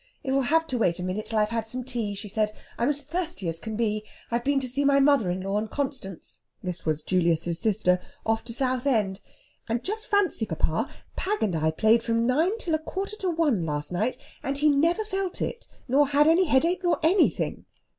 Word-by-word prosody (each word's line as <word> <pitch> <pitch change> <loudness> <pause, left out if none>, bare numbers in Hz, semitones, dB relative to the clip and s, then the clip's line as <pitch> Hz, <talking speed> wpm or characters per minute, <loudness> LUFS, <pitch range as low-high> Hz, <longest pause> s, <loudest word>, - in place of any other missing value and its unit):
"It 265 - -2
will 275 +1 +3
have 325 +1 +3
to 255 -6 -2
wait 175 -6 +2
a - - -3
minute 185 +4 -3
till 225 - -1
I've 210 0 +2
had 225 -1 -2
some 250 +2 -4
tea," 235 -5 -2
she 205 +2 -5
said. 210 +1 0 0.3
"I'm 240 - +2
as 290 0 0
thirsty 330 - -4
as 165 0 -1
I - - -20
can 220 -1 -3
be. 215 -1 0 0.3
I've 235 +1 0
been 280 +1 +2
to 260 - -1
see 270 +3 -1
my 280 0 +4
mother 275 -8 +4
in 180 +1 -2
law 195 +2 -1
and 215 0 -4
Constance" 260 - -4 0.2
this 180 -3 -3
was 155 -1 0
Julius's 170 -2 +1
sister 185 -3 +2 0.3
"off 225 0 +1
to 235 - -6
Southend. 250 -6 +1 0.5
And 230 +2 -1
just 435 +3 -3
fancy, 390 - +2
papa; 165 - -1 0.3
Pag 415 +3 -1
and 195 -6 0
I 160 0 +1
played 220 +8 +3
from 230 0 0
nine 320 - +2
till 350 -8 -2
a 315 - +2
quarter 390 +6 -4
to 380 -3 -1
one 310 - +1
last 150 -1 -3
night, 215 +8 -1 0.2
and 275 +1 -2
he 300 +1 +4
never 335 +9 +2
felt 385 -3 -3
it, 475 - -4 0.2
nor 275 +3 +4
had 290 +2 +4
any 340 +4 +5
headache 335 +5 +2
nor 350 - +2
anything." 360 +5 +2
245 Hz, 220 wpm, -26 LUFS, 205-300 Hz, 0.5 s, any